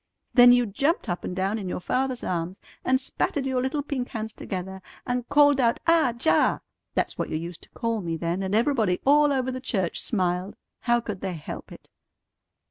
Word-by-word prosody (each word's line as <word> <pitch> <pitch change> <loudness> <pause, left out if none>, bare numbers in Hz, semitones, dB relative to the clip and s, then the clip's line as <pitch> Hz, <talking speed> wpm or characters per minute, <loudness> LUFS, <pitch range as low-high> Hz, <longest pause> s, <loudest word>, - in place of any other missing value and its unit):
Then 245 -1 +8
you 245 0 +5
jumped 275 - 0
up 175 - -2
and 180 - -4
down 195 +4 0
in 190 -3 -5
your - - -3
father's 255 +7 -1
arms, 175 +1 -3 0.2
and 260 0 +3
spatted 270 +1 -2
your 260 -1 0
little 285 +3 -1
pink 265 -3 -3
hands 220 -1 -5
together, 190 0 -6 0.2
and 245 -1 -2
called 290 -1 +5
out 235 -2 +2
'Ah 330 -6 +4
Jah!' 265 - +3 0.3
That's - - -1
what - - -1
you - - -1
used 170 +1 -7
to - - -16
call 230 -2 -2
me 165 -2 -3
then, 170 +3 -2
and 190 +1 -1
everybody 225 -6 +2
all 295 +1 +5
over 260 -1 0
the 255 0 -5
church 195 -9 -1
smiled. 185 -2 -1 0.2
How 240 -1 +2
could 210 -5 -6
they 190 -2 -3
help 150 - -8
it?" - - -13
230 Hz, 200 wpm, -26 LUFS, 185-260 Hz, 0.3 s, Then